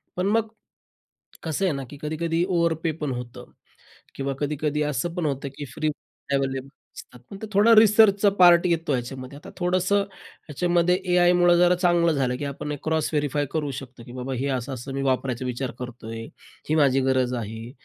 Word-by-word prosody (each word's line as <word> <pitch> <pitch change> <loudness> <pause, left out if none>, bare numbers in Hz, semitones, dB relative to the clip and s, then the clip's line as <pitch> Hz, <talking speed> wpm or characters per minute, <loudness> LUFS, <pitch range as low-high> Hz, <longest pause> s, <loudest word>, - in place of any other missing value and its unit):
पण 180 +2 -1
मग 225 +2 +2 1.0
कसं 160 +4 -2
आहे 185 - +2
ना, 135 -1 -4
की 145 - -9
कधी-कधी 165 +2 -1
ओव्हर 170 -3 +2
पे 165 -2 0
पण 150 -2 -2
होतं 125 -1 -7 0.7
किंवा 140 0 -2
कधी-कधी 150 0 -1
असं 150 +5 -2
पण 175 -3 -2
होतं 140 -1 -2
की 145 - -5
फ्री 155 - -2 0.5
अवेलेबल 135 -1 -1 0.3
असतात. 125 - -12
पण 195 - -8
ते 220 - -5
थोडा 210 +4 +6
रिसर्चचा 210 -1 +6
पार्ट 175 -1 +7
येतो 165 -2 0
ह्याच्यामध्ये, 130 +2 -5
आता 145 - -12
थोडंसं 185 +2 +1
ह्याच्यामध्ये 175 -2 -1 0.2
एआयमुळं 175 0 +5
जरा 175 +1 +5
चांगलं 175 -1 +3
झालं, 135 -4 0
की 145 - -4
आपण 140 +1 -5
एक 145 - -6
क्रॉस 160 -1 0
व्हेरिफाय 145 -1 0
करू 150 -3 -2
शकतो 130 -3 -12
की - - -11
बाबा 130 +1 -4
हे 130 +2 -2
असं, 125 +2 -5
असं 130 +2 -7
मी 135 - -2
वापरायचा 130 -1 -1
विचार 125 +1 -3
करतोय, 115 -2 -7 0.5
ही 155 - +2
माझी 135 -3 +3
गरज 130 -1 +1
आहे. 110 +3 -8
150 Hz, 180 wpm, -24 LUFS, 130-175 Hz, 1.0 s, पार्ट